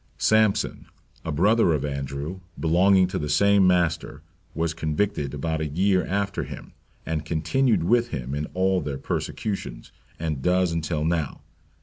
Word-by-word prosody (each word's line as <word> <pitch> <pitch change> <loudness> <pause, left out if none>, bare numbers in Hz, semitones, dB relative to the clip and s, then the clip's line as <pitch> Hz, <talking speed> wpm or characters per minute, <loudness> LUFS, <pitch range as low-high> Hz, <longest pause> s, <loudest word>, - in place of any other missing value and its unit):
Sampson, 110 -2 +2 0.4
a 80 - -3
brother 100 +4 +3
of 75 -2 -1
Andrew, 70 +5 -4 0.2
belonging 95 +4 +4
to - - -2
the 75 - -3
same 100 +4 +4
master, 90 -3 0 0.3
was 80 0 -1
converted 80 -2 -1
about 80 +2 -2
a 80 - -1
year 95 +4 +2
after 100 +2 -1
him, - - -9 0.3
and 80 -2 -2
continued 85 - +1
with 120 +6 +3
him 65 - -5
in 75 +1 -2
all 95 0 +2
their 70 -2 -4
persecutions, 95 - -4 0.3
and 80 -4 -3
does 90 +2 +2
until 80 -1 -2
now. 80 -3 -1
85 Hz, 145 wpm, -25 LUFS, 75-95 Hz, 0.4 s, belonging